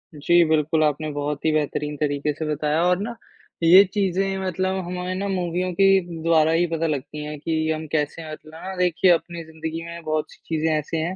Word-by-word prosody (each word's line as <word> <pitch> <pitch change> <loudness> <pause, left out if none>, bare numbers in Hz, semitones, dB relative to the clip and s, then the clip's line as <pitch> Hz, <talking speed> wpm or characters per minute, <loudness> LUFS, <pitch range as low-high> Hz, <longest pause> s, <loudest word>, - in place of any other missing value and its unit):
जी, 170 +4 +4
बिल्कुल, 155 0 +2
आपने 155 +1 0
बहुत 145 +1 -3
ही 160 - +4
बेहतरीन 150 -1 -1
तरीके 145 0 0
से 155 +2 -5
बताया 150 +2 0
और 180 +1 +2
ना, 235 +3 -4 0.5
ये 180 +4 +9
चीज़ें 195 -1 0
मतलब 185 +1 -1
हमारे 180 +1 -4
ना 200 +2 -2
मूवियों 180 -1 -1
के 195 - +6 0.4
द्वारा 160 -1 +4
ही 165 +2 +3
पता 165 0 0
लगती 150 +1 -4
हैं 150 0 -6
कि 160 +1 -1
हम 155 0 -3
कैसे 155 +1 -1
हैं 160 - -8
और 155 - -6
ना 165 +5 -8
देखिए 180 0 +3
अपनी 170 0 -1
ज़िंदगी 160 +1 -6
में 170 0 -8
बहुत 155 0 -1
चीज़ें 160 0 -2
ऐसे 150 +2 -3
हैं 170 +4 -2
160 Hz, 200 wpm, -23 LUFS, 155-180 Hz, 0.5 s, ये